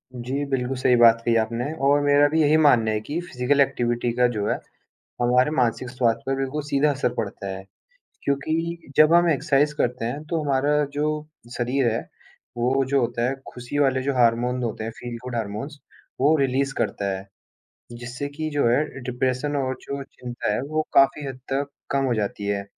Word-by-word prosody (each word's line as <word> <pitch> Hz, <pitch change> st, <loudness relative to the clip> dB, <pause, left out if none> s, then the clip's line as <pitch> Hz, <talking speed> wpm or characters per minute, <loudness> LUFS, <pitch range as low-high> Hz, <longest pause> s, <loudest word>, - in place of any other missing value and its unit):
जी, 130 Hz, +4 st, -3 dB
बिल्कुल, 130 Hz, -1 st, -1 dB
सही 125 Hz, -1 st, +3 dB
बात 115 Hz, -1 st, +6 dB
कही 115 Hz, -1 st, +3 dB
आपने 115 Hz, +2 st, -1 dB, 0.2 s
और 145 Hz, +1 st, +5 dB
मेरा 145 Hz, 0 st, +5 dB
भी 160 Hz, +2 st, +1 dB
यही 150 Hz, 0 st, +4 dB
मानना 120 Hz, -8 st, +4 dB
है 105 Hz, -, 0 dB
कि 145 Hz, +9 st, -4 dB
फिज़िकल 140 Hz, -3 st, 0 dB
एक्टिविटी 120 Hz, -2 st, 0 dB
का 125 Hz, +1 st, +3 dB
जो 105 Hz, 0 st, -1 dB
है, -, -, +1 dB, 0.7 s
हमारे 125 Hz, +3 st, +3 dB
मानसिक 125 Hz, 0 st, 0 dB
स्वास्थ्य 120 Hz, -3 st, 0 dB
पर 135 Hz, -, 0 dB
बिल्कुल 135 Hz, +3 st, -2 dB
सीधा 145 Hz, +1 st, +2 dB
असर 135 Hz, -3 st, -1 dB
पड़ता 100 Hz, -3 st, -4 dB
है। 95 Hz, 0 st, -5 dB, 0.6 s
क्योंकि 160 Hz, +3 st, -2 dB
जब 155 Hz, +1 st, +6 dB
हम 175 Hz, 0 st, +5 dB
एक्सरसाइज़ 145 Hz, 0 st, +2 dB
करते 125 Hz, -1 st, 0 dB
हैं, 130 Hz, +6 st, -3 dB
तो 160 Hz, +1 st, -2 dB
हमारा 145 Hz, +1 st, +2 dB
जो 150 Hz, +1 st, -1 dB, 0.3 s
शरीर 125 Hz, 0 st, +1 dB
है, 115 Hz, -, -1 dB, 0.6 s
वो 130 Hz, +3 st, +1 dB
जो 140 Hz, 0 st, +2 dB
होता 120 Hz, 0 st, 0 dB
है, 135 Hz, -, -1 dB, 0.2 s
खुशी 125 Hz, +3 st, -5 dB
वाले 135 Hz, -2 st, +2 dB
जो 140 Hz, +1 st, -1 dB
हार्मोन 125 Hz, +1 st, +2 dB
होते 110 Hz, -1 st, -3 dB
हैं, 115 Hz, -, -3 dB
फील 120 Hz, -1 st, -6 dB
गुड 125 Hz, -1 st, -5 dB
हार्मोन्स 115 Hz, +7 st, -4 dB, 0.4 s
वो 150 Hz, +4 st, +5 dB
रिलीज़ 135 Hz, -1 st, 0 dB
करता 100 Hz, -1 st, -1 dB
है, 95 Hz, +1 st, -9 dB, 0.7 s
जिससे 120 Hz, +4 st, -6 dB
कि 155 Hz, 0 st, -2 dB
जो 145 Hz, -4 st, +2 dB
है 125 Hz, +6 st, +3 dB, 0.2 s
डिप्रेशन 130 Hz, +3 st, -1 dB
और 130 Hz, -2 st, -1 dB
जो 140 Hz, 0 st, -5 dB
चिंता 125 Hz, -5 st, -4 dB
है 105 Hz, -, -1 dB
वो 155 Hz, 0 st, -1 dB
काफ़ी 140 Hz, +2 st, +4 dB
हद 130 Hz, -1 st, -7 dB
तक 140 Hz, +1 st, -1 dB, 0.2 s
कम 135 Hz, 0 st, +1 dB
हो 125 Hz, -, +1 dB
जाती 105 Hz, -1 st, -3 dB
है। 100 Hz, -1 st, -1 dB
130 Hz, 190 wpm, -24 LUFS, 120-145 Hz, 0.7 s, बात